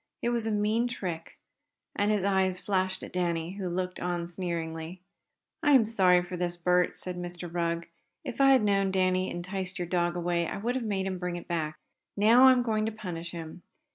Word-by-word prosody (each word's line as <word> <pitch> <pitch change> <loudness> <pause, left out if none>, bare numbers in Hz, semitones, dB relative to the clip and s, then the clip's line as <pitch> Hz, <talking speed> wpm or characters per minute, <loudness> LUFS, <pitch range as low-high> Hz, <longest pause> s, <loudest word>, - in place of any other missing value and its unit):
It 235 - +2
was 235 -2 -1
a - - 0
mean 215 +3 +1
trick!" 180 -9 -5 0.6
and 205 +1 +1
his 210 -3 +1
eyes 190 -2 +2
flashed 190 -1 -1
at - - -9
Danny, 170 -2 -1
who 190 -2 -4
looked 180 +1 -3
on 175 -1 -2
sneeringly. 170 -1 -4 0.6
"I 295 - +4
am 255 -5 +6
sorry 185 -5 +4
for 180 +1 -6
this, 175 0 -2
Bert," 180 +1 +2
said 180 -1 -6
Mr. 175 0 -6
Rugg. 170 -1 -1 0.4
"If 255 - -3
I 275 - +7
had 260 - +4
known 195 -1 +2
Danny 185 -1 +1
enticed 185 +1 -4
away - - 0
your - - -14
dog 175 -1 +1
I 170 -1 -1
would 230 +5 -1
have 260 -1 -2
made 200 -3 -1
him 190 -1 -3
bring 180 -1 -3
it 175 - -8
back. 155 -3 -2 0.4
Now 230 +5 +7
I - - +9
am 250 -1 +3
going 215 -2 0
to - - -1
punish 180 -6 -6
him. 170 0 -8
185 Hz, 205 wpm, -29 LUFS, 175-205 Hz, 0.6 s, I